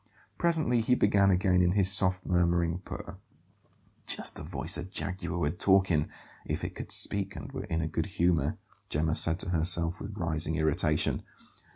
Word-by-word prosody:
Presently 155 Hz, -9 st, +2 dB
he 125 Hz, +3 st, +2 dB
began 100 Hz, -3 st, +3 dB
again 90 Hz, -1 st, +2 dB
in 90 Hz, 0 st, +2 dB
his 100 Hz, -1 st, +4 dB
soft, 95 Hz, -2 st, +1 dB
murmuring 85 Hz, -1 st, +1 dB
purr 95 Hz, -, -9 dB, 0.9 s
("Just -, -, -3 dB
the -, -, -7 dB
voice 75 Hz, +6 st, -2 dB
a 85 Hz, -, -4 dB
jaguar 90 Hz, -1 st, -4 dB
would 85 Hz, +1 st, -2 dB
talk 95 Hz, -1 st, +4 dB
in, 75 Hz, -2 st, +1 dB, 0.3 s
if -, -, -4 dB
it -, -, -4 dB
could -, -, -8 dB
speak 100 Hz, -1 st, +3 dB
and -, -, -8 dB
were 95 Hz, -, -6 dB
in 85 Hz, -5 st, -2 dB
a 80 Hz, -, -2 dB
good 80 Hz, +2 st, -3 dB
humour," 85 Hz, -3 st, 0 dB, 0.3 s
Gemma 80 Hz, +2 st, 0 dB
said 80 Hz, +1 st, +2 dB
to -, -, -3 dB
herself 85 Hz, +1 st, +1 dB
with 100 Hz, +1 st, -8 dB
rising 80 Hz, -3 st, 0 dB
irritation). 75 Hz, 0 st, +1 dB
90 Hz, 175 wpm, -29 LUFS, 80-95 Hz, 0.9 s, his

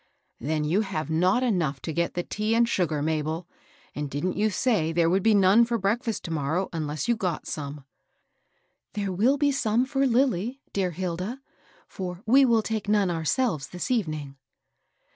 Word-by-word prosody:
" -, -, -45 dB
Then 155 Hz, +4 st, -1 dB
you 170 Hz, +8 st, +2 dB
have 175 Hz, -6 st, -3 dB
not 180 Hz, +10 st, +2 dB
enough 170 Hz, -, 0 dB
to 160 Hz, -, -4 dB
get 170 Hz, +2 st, -1 dB
the 175 Hz, -, -1 dB
tea 215 Hz, +4 st, -1 dB
and 235 Hz, 0 st, +4 dB
sugar, 165 Hz, -9 st, 0 dB
Mabel? 160 Hz, +2 st, -2 dB, 0.5 s
And 145 Hz, -1 st, -4 dB
didn't 145 Hz, +7 st, -2 dB
you 215 Hz, +1 st, +2 dB
say 200 Hz, -6 st, +1 dB
there 165 Hz, 0 st, +2 dB
would 190 Hz, +2 st, +2 dB
be 220 Hz, +1 st, +4 dB
none 200 Hz, +4 st, +6 dB
for 235 Hz, 0 st, 0 dB
breakfast 220 Hz, +2 st, -1 dB
to 165 Hz, -, -6 dB
morrow, 160 Hz, +5 st, -1 dB
unless 155 Hz, +2 st, -3 dB
you 235 Hz, -, +3 dB
got 180 Hz, -7 st, -3 dB
some?" 145 Hz, -2 st, -6 dB, 0.5 s
" -, -, -46 dB
There 200 Hz, -2 st, -2 dB
will 230 Hz, +10 st, +2 dB
be 285 Hz, 0 st, +2 dB
some 240 Hz, -2 st, +1 dB
for 270 Hz, 0 st, +1 dB
Lilly, 245 Hz, -1 st, +1 dB
dear. 190 Hz, -2 st, 0 dB
Hilda; 185 Hz, -, -4 dB, 0.5 s
for 180 Hz, 0 st, -6 dB
we 265 Hz, +5 st, +6 dB
will 230 Hz, -3 st, +3 dB
take 215 Hz, -2 st, -3 dB
none 205 Hz, -3 st, +3 dB
ourselves 165 Hz, -, 0 dB
this 180 Hz, +8 st, -5 dB
evening." 155 Hz, -, -2 dB
185 Hz, 180 wpm, -26 LUFS, 160-225 Hz, 0.5 s, none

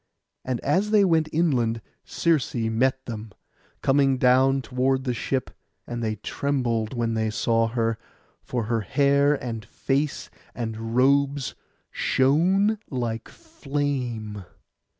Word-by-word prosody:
And 130 Hz, -2 st, -2 dB
as 200 Hz, +3 st, +1 dB
they 210 Hz, -2 st, +5 dB
went 160 Hz, -3 st, +2 dB
inland 125 Hz, -9 st, +1 dB, 0.2 s
Circe 165 Hz, -7 st, 0 dB
met 120 Hz, +3 st, 0 dB
them, 110 Hz, -2 st, -7 dB, 0.5 s
coming 135 Hz, -1 st, +3 dB
down 130 Hz, +2 st, +4 dB
toward 130 Hz, +1 st, 0 dB
the 125 Hz, -2 st, -1 dB
ship; 130 Hz, +2 st, -2 dB, 0.3 s
and 120 Hz, 0 st, -5 dB
they 110 Hz, -1 st, -1 dB
trembled 120 Hz, -1 st, -1 dB
when 115 Hz, -1 st, 0 dB
they 110 Hz, -1 st, 0 dB
saw 115 Hz, 0 st, +1 dB
her, 115 Hz, -1 st, -1 dB, 0.4 s
for 120 Hz, -2 st, -3 dB
her 115 Hz, +1 st, 0 dB
hair, 140 Hz, +6 st, +3 dB
and 115 Hz, -5 st, -5 dB
face, 135 Hz, +5 st, -2 dB, 0.2 s
and 115 Hz, -1 st, -4 dB
robes 140 Hz, +1 st, +2 dB, 0.4 s
shone 185 Hz, +11 st, +2 dB
like 120 Hz, -3 st, -3 dB
flame. 135 Hz, -, -4 dB
130 Hz, 120 wpm, -25 LUFS, 115-140 Hz, 0.5 s, they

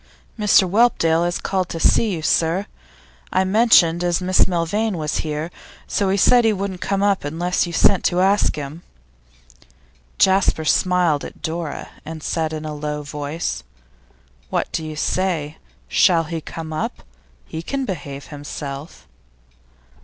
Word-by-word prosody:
'Mr 210 Hz, -3 st, +4 dB
Whelpdale 175 Hz, -6 st, +3 dB
has 175 Hz, 0 st, -1 dB
called 185 Hz, -2 st, -2 dB
to 165 Hz, -, -5 dB
see 225 Hz, -, +3 dB
you, 170 Hz, -5 st, -3 dB
sir. 170 Hz, +5 st, +1 dB, 0.7 s
I 185 Hz, -, +2 dB
mentioned 185 Hz, -5 st, +4 dB
as 175 Hz, -1 st, +1 dB
Miss 185 Hz, 0 st, +3 dB
Milvain 190 Hz, +4 st, -1 dB
was 155 Hz, -1 st, -2 dB
here, 155 Hz, +2 st, -3 dB, 0.3 s
so 200 Hz, -2 st, 0 dB
he 195 Hz, -, +2 dB
said 240 Hz, +5 st, +5 dB
he 225 Hz, -, +4 dB
wouldn't 195 Hz, -2 st, -4 dB
come 195 Hz, 0 st, 0 dB
up 200 Hz, -1 st, +2 dB
unless 175 Hz, +5 st, -1 dB
you -, -, -5 dB
sent 195 Hz, +2 st, +4 dB
to 175 Hz, -, +2 dB
ask 195 Hz, +2 st, +3 dB
him.' 150 Hz, +3 st, -7 dB, 1.4 s
Jasper 190 Hz, -4 st, +3 dB
smiled 175 Hz, -3 st, +2 dB
at -, -, -10 dB
Dora, 160 Hz, -2 st, -4 dB
and 155 Hz, 0 st, -8 dB
said 160 Hz, -2 st, -1 dB
in 155 Hz, 0 st, -5 dB
a 155 Hz, -, -4 dB
low 150 Hz, 0 st, -4 dB
voice. 145 Hz, -, -4 dB, 0.9 s
'What -, -, -1 dB
do 160 Hz, -, -2 dB
you 155 Hz, -1 st, -6 dB
say? 160 Hz, -2 st, -1 dB, 0.3 s
Shall 165 Hz, -, +4 dB
he 165 Hz, 0 st, -5 dB
come 160 Hz, 0 st, -7 dB
up? 155 Hz, -, -4 dB, 0.4 s
He 160 Hz, -, -6 dB
can 270 Hz, +9 st, -3 dB
behave 140 Hz, -, -6 dB
himself. 145 Hz, 0 st, -8 dB
170 Hz, 150 wpm, -21 LUFS, 155-190 Hz, 1.4 s, said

